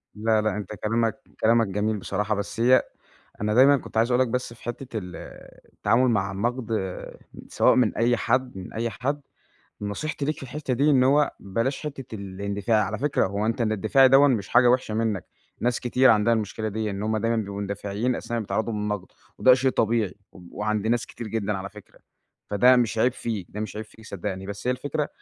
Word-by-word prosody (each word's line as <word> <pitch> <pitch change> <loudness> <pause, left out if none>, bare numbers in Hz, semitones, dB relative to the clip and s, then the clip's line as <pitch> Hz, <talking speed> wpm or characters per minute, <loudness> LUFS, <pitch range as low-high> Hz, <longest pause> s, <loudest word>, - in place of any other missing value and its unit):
لأ، 110 0 +2
لأ 105 -2 -1
أنت 105 0 -6
كلامَك 115 +5 -1 0.2
كلامَك 115 0 +3
جميل 105 +2 -1
بصراحة 105 +3 -1
بس 100 +2 -5
هي 125 +2 +5 0.6
أنا 105 0 0
دايمًا 140 +3 +7
كنت 115 - -9
عايز 115 +3 +3
أقول 125 +1 +4
لَك 125 - -1
بس 125 0 -3
في - - -20
حتّة 120 0 -6
ال 90 -3 -8 0.6
التعامل 125 +2 +2
مع 100 -3 0
النقد، 120 +4 -2 0.8
سواء - - +4
من 120 -4 +2
أي 120 +1 +3
حد 125 -2 0
من 95 - -8
أي 115 +1 -2
حد، 140 +6 -2 0.6
نصيحتي 140 +8 -3
ليك 150 +1 -1
في - - -12
الحتّة 135 0 -3
دي 145 +4 +3
إن 130 -2 +4
هو 145 +2 +4
بلاش 115 +10 -2
حتّة 135 -6 -7
الاندفاع، 100 +2 -1
على - - -4
فكرة 145 -5 +1
هو 100 +3 -2
أنت 115 +1 -1
الإندفاعي 110 +5 +4
دوًا 140 +2 +6
مش 110 -6 0
حاجة 120 0 +5
وحشة 125 -3 +1
منَّك، 110 -4 -1 0.4
ناس 120 +1 0
كتير 125 +1 +4
عندها 110 +1 +3
المشكلة 110 0 -3
ديًا، 110 0 -2
إن 100 +1 -4
هُم 110 0 0
دايمًا 115 +2 0
بيبقوا 100 -2 -3
مندفعين 100 +4 -2
أثناء 120 0 -3
ما - - -2
بيتعرضوا 110 +2 -2
للنقد 105 -2 -3 0.3
وده 130 -1 +7
شيء 130 0 +1
طبيعي، 110 -5 0 0.2
و - - -14
وعند 110 0 -1
ناس 120 +1 +1
كتير 115 -2 -8
جدًا 105 -1 -1
على 100 +1 -6
فكرة، 105 -1 -16 0.5
فده 125 +5 +5
مش 115 -2 +1
عيب 125 +2 +3
فيك، 110 -8 -4
ده 105 - -6
مش 105 -1 -5
عيب 110 - -4
فيك 110 +1 -17
صدقني. 95 0 -5
بس 100 +4 -7
هي - - +3
الفكرة 145 +3 -2
110 Hz, 200 wpm, -25 LUFS, 105-125 Hz, 0.8 s, دايمًا